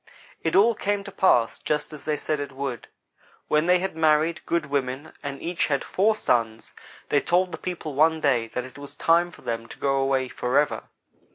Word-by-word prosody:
"It 165 - 0
all 220 +4 +6
came 205 -1 -1
to 200 - -9
pass, 120 -13 +3
just 150 +1 -2
as 150 - -10
they 150 -1 0
said 150 +1 -2
it 145 0 -4
would. 130 -3 -5 0.6
When 150 +2 +2
they 180 0 +6
had 190 -1 -3
married 160 +1 +2
good 170 -2 0
women 140 0 -3
and 140 -1 -5
each 175 0 -1
had 140 -2 0
four 215 +3 +2
sons, 115 - -1 0.4
they 145 - +3
told 180 +1 +1
the - - -6
people 170 -4 -5
one 160 +3 +3
day 125 -6 +2
that 125 - -2
it 130 +2 -12
was 145 0 -9
time 170 +1 +3
for - - -16
them 115 0 -3
to - - -11
go 135 -1 +1
away 135 -1 +1
forever. 130 +4 0
150 Hz, 200 wpm, -25 LUFS, 135-170 Hz, 0.6 s, all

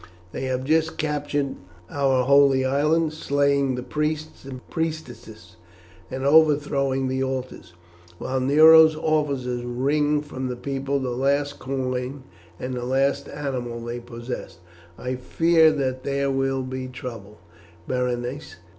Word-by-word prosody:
They 130 - -4
have 130 0 -2
just 160 +3 +1
captured 145 -2 -2 0.3
our 135 -1 +1
Holy 135 0 +4
Island, 150 +4 +1
slaying 140 -3 +1
the 125 - -5
priests 155 +1 -3
and 130 -2 -9
priestesses, 125 - -6 0.5
and 130 +1 -4
overthrowing 140 -3 +3
the 130 +1 -1
altars, 130 -9 -5 0.4
while 130 +6 -2
Nero's 155 +4 +7
officers 140 -6 -1
wring 145 +4 0
from 130 -3 -5
the 125 - -3
people 135 +2 -2
the 130 -2 -3
last 140 +3 0
coin 130 0 -3 0.4
and 130 0 -4
the 125 -1 -4
last 135 +2 0
animal 125 -5 -4
they 120 +1 -5
possess. 120 -5 -7 0.4
I 125 0 -4
fear 160 +5 +4
that 130 -3 -2
there 140 0 0
will 135 0 0
be 130 0 -5
trouble, 115 -5 -8 0.5
Berenice. 125 +3 -3
135 Hz, 130 wpm, -24 LUFS, 125-145 Hz, 0.5 s, Nero's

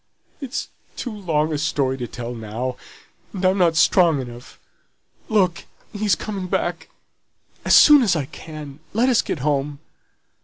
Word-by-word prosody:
"It's 275 -1 -4 0.3
too 245 - -4
long 160 -6 -1
a 150 - -2
story 145 -4 0
to 120 - -4
tell 120 0 -6
now, 115 +3 -4 0.6
and 190 -1 -3
I'm 190 +1 +3
not 170 -3 +3
strong 165 -1 +4
enough. 120 -1 -9 0.7
Look! 185 -5 +1 0.3
he's 205 -3 +1
coming 195 -4 -5
back. 175 -1 -2 0.8
As - - +5
soon 295 -2 +8
as 205 -8 +2
I 150 -4 -1
can, 150 -1 -10 0.2
let 245 +4 +3
us 245 - +4
get 145 - -4
home." 145 -1 0
160 Hz, 150 wpm, -21 LUFS, 135-195 Hz, 0.8 s, soon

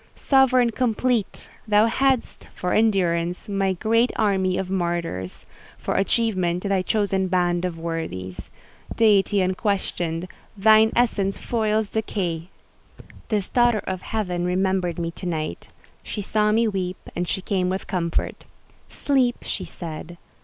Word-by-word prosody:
Sovereign 255 -3 +4
complete! 240 -2 0 0.2
thou 210 0 +5
hadst, 260 +2 0
for 180 - -2
endurance, 180 -5 +1
thy 195 -2 0
great 230 +6 +2
army 190 -4 +1
of 190 -1 -3
martyrs; 170 - -3 0.3
for - - -3
achievement, 190 -4 +1
thy 195 -2 +1
chosen 195 -1 0
band 175 -1 +1
of 175 -2 -3
worthies. 130 - -5 0.5
Deity 205 -2 +4
unquestioned, 185 -3 -1 0.3
thine 220 +2 +6
essence 205 -5 +1
foils 220 -2 0
decay! 180 -6 -2 0.8
This 210 -4 0
daughter 240 -3 +2
of 185 -1 -3
Heaven 180 -6 -2
remembered 185 -1 0
me 170 -1 -2
to 180 - -7
night; 155 - -3 0.3
she 205 - -5
saw 210 +1 +1
me 225 +2 +3
weep, 185 -3 -2 0.2
and 175 0 -2
she - - -1
came 185 -2 0
with 190 +1 -3
comfort: 170 -3 -2 0.4
"Sleep," 260 -4 +1
she - - -4
said. 165 0 -8
190 Hz, 130 wpm, -23 LUFS, 175-220 Hz, 0.8 s, thine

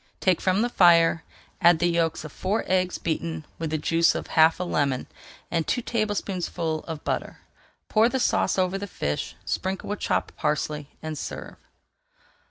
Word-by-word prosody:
Take 185 -3 +2
from 190 +3 +2
the 240 - 0
fire, 165 -5 +5 0.4
add 170 0 +6
the 175 - +1
yolks 170 -2 +1
of 155 - -8
four 195 +8 -1
eggs 185 -1 +1
beaten 160 -1 -3
with 165 -1 -2
the 155 - 0
juice 165 +2 +3
of - - -3
half 160 +1 +5
a - - 0
lemon, 140 -7 0 0.5
and 165 -2 0
two 245 - 0
tablespoonfuls 190 -8 -2
of 160 -3 -6
butter. - - -3 0.5
Pour 225 +2 +4
the 265 - -1
sauce 245 - +1
over 185 +1 +1
the 200 - -5
fish, 75 - -3
sprinkle 190 +1 -3
with 205 - -3
chopped - - -1
parsley, 150 -1 -2
and 155 -2 -4
serve. - - -7
170 Hz, 170 wpm, -25 LUFS, 160-190 Hz, 0.5 s, add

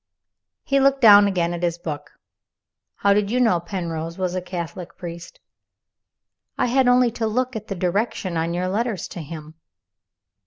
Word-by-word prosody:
He 275 0 +2
looked 275 0 +3
down 205 -3 +8
again 175 -3 0
at 175 - -5
his 170 -1 0
book. 155 -4 -6 0.8
"How 200 0 +3
did 200 0 +1
you 245 +3 +1
know 225 -8 +3
Penrose 170 -2 -5
was 185 -2 -1
a 185 - -2
Catholic 175 -1 -7
priest?" 170 -1 -9 1.2
"I - - +2
had 255 +1 +2
only 245 -1 +4
to 225 -1 -2
look 250 +3 -1
at 215 0 -6
the 195 - -4
direction 185 0 -1
on 165 +1 -1
your 180 +1 -1
letters 210 -1 -2
to 175 - -7
him." 155 0 -9
185 Hz, 165 wpm, -22 LUFS, 170-225 Hz, 1.2 s, down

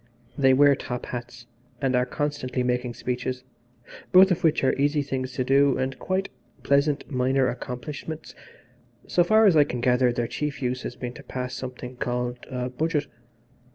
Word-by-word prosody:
They 135 -2 +4
wear 145 +1 +6
top 125 -2 -5
hats 120 0 -7 0.3
and 135 -2 +1
are 125 0 +2
constantly 145 -3 -2
making 125 -1 -1
speeches, 125 +1 -3 0.7
both 190 +1 +7
of 180 +1 0
which 160 -3 +3
are 130 - +3
easy 145 +1 +1
things 130 -2 -4
to 130 - -1
do 135 +1 +3
and 130 0 -2
quite 190 +1 -1 0.3
pleasant 140 +1 +2
minor 130 0 +2
accomplishments. 135 +6 -6 0.7
So 175 - +3
far 215 +5 +5
as 190 -5 +5
I 150 - +7
can 125 -4 -4
gather 125 0 +3
their 120 0 -1
chief 150 +2 -3
use 125 0 -2
has 125 - -6
been 125 -1 -6
to - - -12
pass 125 0 -5
something 125 -1 -7
called 125 0 -2
a 125 -1 -3
Budget. 155 +3 -1
130 Hz, 170 wpm, -25 LUFS, 125-145 Hz, 0.7 s, both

